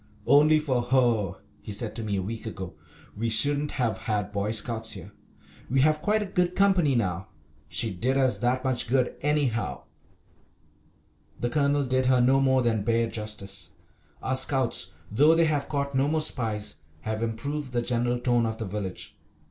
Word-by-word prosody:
"Only 150 +2 +6
for 135 -5 0
her," 120 -6 +2 0.3
he - - -8
said 105 +1 -4
to 115 - -4
me 105 -2 -2
a 95 - -1
week 110 +3 -5
ago, 95 -4 -6 0.4
"we 115 +2 -1
shouldn't 145 +6 +1
have 120 -5 -1
had 105 -3 -2
Boy 100 0 -1
Scouts 110 0 -2
here. 100 0 -10 0.6
We 130 +2 +3
have 155 +1 +3
quite 210 +4 +2
a - - -4
good 180 -2 0
company 185 -8 +3
now. 95 -4 -1 0.4
She 95 +7 0
did 125 +9 0
us 130 -2 +2
that 125 +2 +1
much 130 -3 0
good, 125 0 +1
anyhow." 145 -6 0 1.6
The 120 - -1
Colonel 145 +1 +2
did 130 0 +1
her 130 -1 +4
no 130 +2 +4
more 130 -1 +3
than 115 -3 +1
bare 115 +2 +2
justice. 100 -5 -6 0.5
Our 130 - 0
Scouts, 130 -8 +1 0.2
though 150 +9 +5
they 165 0 +4
have 145 -3 0
caught 140 -1 -1
no 135 +1 +2
more 155 +1 +1
spies, 110 -8 -2 0.2
have 110 0 -3
improved 130 +5 -3
the 120 -1 0
general 120 0 0
tone 120 -1 +2
of 110 0 -4
the 110 - -4
village. 95 -2 -6
120 Hz, 175 wpm, -27 LUFS, 110-140 Hz, 1.6 s, Only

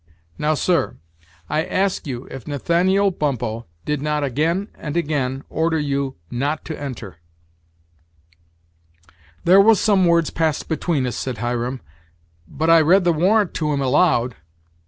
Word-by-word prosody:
Now, 155 +1 +1
sir, 170 - 0 0.5
I 155 +1 0
ask 190 -2 -1
you 125 -1 -5
if 135 -4 -9
Nathaniel 180 +7 +2
Bumppo 120 -8 -3 0.2
did 150 -2 -1
not 150 0 -1
again 165 - 0
and 150 +1 -5
again 140 -4 -1
order 160 +1 0
you 140 -2 -2 0.2
not 145 +5 -2
to 155 - -6
enter?" 115 - -7 2.3
"There 190 +3 +7
was 215 -1 +5
some 195 -4 +3
words 170 -2 +2
passed 160 -2 -1
between 155 -3 -1
us," 125 - -3
said 130 -3 -4
Hiram, 120 +2 -2 0.7
"but 160 - 0
I 165 -1 +7
read 180 +5 +4
the 175 -1 +3
warrant 195 +5 +2
to 155 -2 -1
him 140 - 0
aloud." 130 -2 +2
150 Hz, 140 wpm, -21 LUFS, 135-170 Hz, 2.3 s, There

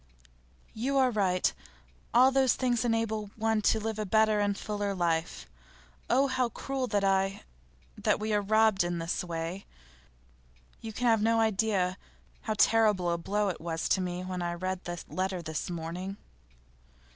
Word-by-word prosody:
'You 265 +5 -1
are 260 -2 +4
right. 190 -4 +1 0.6
All 255 +3 +6
those 265 -3 +3
things 245 -3 0
enable 225 -2 0
one 220 0 +1
to 220 - +2
live 220 0 -3
a - - 0
better 220 +1 +3
and 205 -1 0
fuller 205 -2 -3
life. 170 -2 -1 0.6
Oh, 265 +3 +4
how 260 -2 0
cruel 265 +1 -3
that 205 -3 0
I 195 0 +1 0.5
that - - +1
we 215 0 -2
are 205 - +2
robbed 215 -1 +3
in 175 0 -2
this 165 +2 -2
way! 170 +2 -5 1.1
You 225 - -7
can 245 +4 -3
have 225 -3 +4
no 225 +1 +3
idea 200 -4 +1 0.4
how 215 - -2
terrible 210 -7 +3
a 170 - 0
blow 205 +3 0
it 180 - -5
was 165 -1 -2
to 190 - +2
me 180 0 -3
when 185 -1 -4
I 175 0 -2
read 185 +1 -4
that 175 -1 -6
letter 185 0 -2
this 160 +1 -4
morning. 175 +3 -5
205 Hz, 165 wpm, -29 LUFS, 180-225 Hz, 1.1 s, All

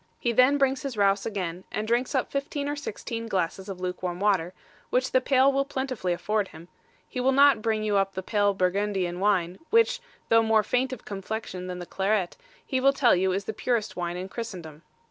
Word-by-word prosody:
He 240 - 0
then 255 +4 +5
brings 270 -1 +1
his 270 -5 -5
rouse 200 0 +2
again, 185 -4 -4
and 215 +1 -3
drinks 240 +4 0
up 260 - 0
fifteen 280 +1 -3
or 290 - -2
sixteen 230 -4 -5
glasses 190 0 -2
of 190 -2 -6
luke 180 0 -4
warm 180 -1 -3
water, 190 -4 +1 0.4
which 255 +1 +1
the 255 - +4
pail 270 +1 +4
will 275 0 +2
plentifully 260 -9 -3
afford 210 +3 0
him: 165 +1 -13 0.4
he 255 - -5
will 260 +2 +3
not 275 -3 +5
bring 220 -1 0
you 210 -1 +1
up 195 0 0
the 190 - -4
pale 205 -2 +1
Burgundian 185 -1 0
wine, 185 -3 +1
which, 460 +2 +3 0.3
though 225 0 +6
more 220 -1 +3
faint 250 +4 0
of 255 - -8
complexion 195 -2 -5
than 180 -1 -5
the 175 - -6
claret, 195 0 0 0.3
he 260 - -1
will 275 +1 +4
tell 255 -6 +4
you 185 +1 +1
is 195 +1 -2
the 220 - -3
purest 230 -1 -1
wine 175 0 -3
in 185 +1 -5
Christendom. 180 -9 -7
210 Hz, 210 wpm, -26 LUFS, 185-255 Hz, 0.4 s, though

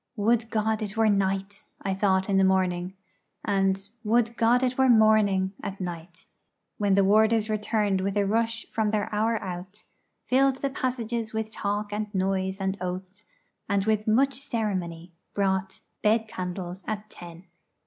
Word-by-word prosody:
'Would 225 +1 +1
God 220 0 0
it 210 0 -5
were 220 -1 +4
night!' 195 0 -1 0.2
I 195 - 0
thought 190 -1 +1
in 195 -2 +2
the 195 - +5
morning; 185 -1 +1 0.5
and 195 -1 +1 0.2
'Would 230 +1 +2
God 240 +3 +3
it 255 0 +1
were 265 0 +3
morning!' 215 -4 +4
at 195 0 -5
night 175 -1 -7 0.5
when 200 -2 +3
the 200 - +4
warders 215 +2 +3
returned 210 -2 0
with 195 +2 -1
a 200 - +2
rush 225 +2 0
from 220 -1 0
their 210 0 -1
hour 220 +2 +1
out, 185 +3 -7 0.4
filled 270 +1 +3
the 275 +1 -3
passages 235 -3 -2
with 220 0 -3
talk 205 0 -3
and 210 0 -2
noise 190 0 0
and 195 0 -2
oaths, 185 +3 -6 0.4
and 200 -1 +1
with 215 -1 +1
much 270 +6 +3
ceremony 185 - -3 0.2
brought 190 -1 -1 0.2
bed 220 +1 +2
candles 180 -1 -5
at 215 0 -4
ten. 170 0 -11
205 Hz, 160 wpm, -26 LUFS, 190-220 Hz, 0.5 s, the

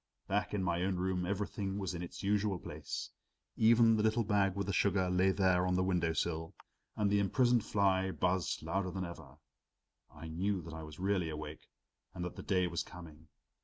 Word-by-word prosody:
Back 100 +1 0
in 95 - 0
my 85 -1 0
own 95 +1 0
room 90 0 -1
everything 100 0 -2
was 95 -2 -3
in 85 - -5
its 90 - -7
usual 100 -1 +1
place. - - -6 0.4
Even 115 0 +5
the - - +2
little 110 +2 +2
paper 105 - -12
bag 100 -2 +3
with 100 -1 -1
the 100 - -2
sugar 95 -1 +2
lay 90 +1 +3
there 95 -2 +3
on 90 - +1
the 95 - +2
window 90 -3 +1
sill, 80 0 -2 0.4
and 105 -2 +1
the 100 - +4
imprisoned 120 +3 +3
fly 95 -2 +2
buzzed 90 -3 0
louder 95 +4 -1
than 95 0 -3
ever. 80 -5 -10 0.7
I 80 +2 -9
knew 95 +5 -1
that - - -8
I 80 - -6
was 75 -1 -9
really 95 -3 +1
awake 75 0 -7 0.5
and 90 - -3
that 90 - -6
the - - -7
day 90 -2 +1
was 85 -1 -1
coming. 80 -3 -11
95 Hz, 200 wpm, -34 LUFS, 85-100 Hz, 0.7 s, Even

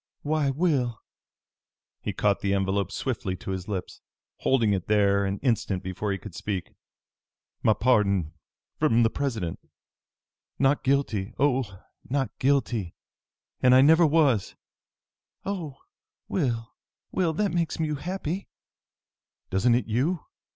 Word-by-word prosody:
"Why, 150 -1 +1
Will!" 135 -6 0 1.0
He - - -3
caught 100 -1 +1
the 100 0 0
envelope 95 0 0
swiftly 100 -8 -2
to 95 - -6
his 95 -1 -4
lips, 95 -4 -5 0.4
holding 115 -6 +2
it 95 -3 -2
there 100 -1 +3
an 100 +1 -1
instant 105 -7 0
before 95 +3 -3
he 95 - -1
could 105 -2 -10
speak. 95 0 -4 0.9
"My 110 - +4
pardon! 100 -7 +2 0.5
From 120 -7 +4
the 115 - +3
President! 115 -12 -2 1.0
Not 135 +1 +2
guilty 130 -7 0
oh, 125 -9 0 0.3
not 135 0 0
guilty! 125 -9 +1 0.7
And 125 0 +6
I 130 - +8
never 160 +5 +6
was!" 145 -9 +2 0.9
"Oh, 170 -9 -4 0.5
Will, 120 -10 -1 0.4
Will! 180 -3 +1
That 200 +4 0
makes 170 -2 -1
you 155 -1 0
happy?" 185 +2 -4 1.0
"Doesn't 115 +6 +3
it 125 - 0
you?" 135 +11 0
120 Hz, 125 wpm, -26 LUFS, 100-145 Hz, 1.0 s, I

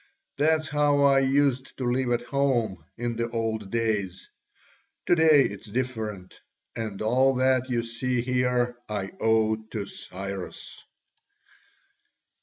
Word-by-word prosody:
That's 155 +1 +2
how 145 -1 +2
I 140 -1 +5
used 135 -1 +1
to 130 - -3
live 125 +1 0
at 120 0 +1
home, 120 - 0
in 120 -1 -3
the 115 0 -1
old 110 -3 -2
days: 105 -5 -1 0.8
to - - +4
day 160 -4 +6
it's 100 0 -5
different, 110 -5 -4 0.3
and 110 -3 -4
all 130 +4 +3
that 130 0 +2
you 120 -2 0
see 120 +1 -1
here 125 -1 0
I 100 -2 -3
owe 110 -1 +2
to 110 -2 -6
Cyrus." 100 -1 -7
120 Hz, 125 wpm, -26 LUFS, 110-130 Hz, 0.8 s, day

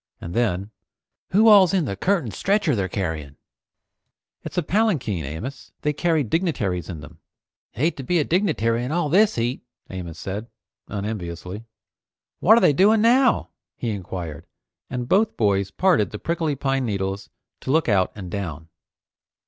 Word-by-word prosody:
And 85 - -7
then, 100 -3 0 0.6
"Who 215 +4 +4
all's 195 -3 +7
in 180 -5 +2
the 100 - -3
curtained 170 - 0
stretcher 195 - +1
they're 95 -3 -1
carrying?" 80 -7 -4 1.1
"It's - - -8
a 175 - +2
palanquin, 155 - 0
Amos. 80 - -7
They 150 - +1
carry 160 0 +1
dignitaries 105 - -1
in 80 -5 -6
them." 75 - -13 0.5
"Hate 155 +8 0
to 135 - -5
be 175 +7 +1
a 155 - +3
dignitary 140 - +1
in 125 - -3
all 170 -2 0
this 200 +7 +4
heat," 120 +3 -1 0.3
Amos 85 -3 -6
said, 100 +5 -5 0.4
unenviously. 100 -1 -5 0.7
"What 220 +5 +6
are - - +4
they 150 - +5
doing 210 +8 +4
now?" 250 +2 +4 0.3
he 120 - -3
enquired, 90 -6 -6 0.4
and 125 -1 -4
both 210 - +2
boys 100 -3 +1
parted 135 - +2
the 105 - -6
prickly 165 +2 -1
pine 135 0 -1
needles 100 -1 -3 0.3
to - - -8
look 160 +4 +2
out 95 -5 +2
and 95 -4 -8
down. 80 -5 -5
120 Hz, 155 wpm, -23 LUFS, -, 1.1 s, all's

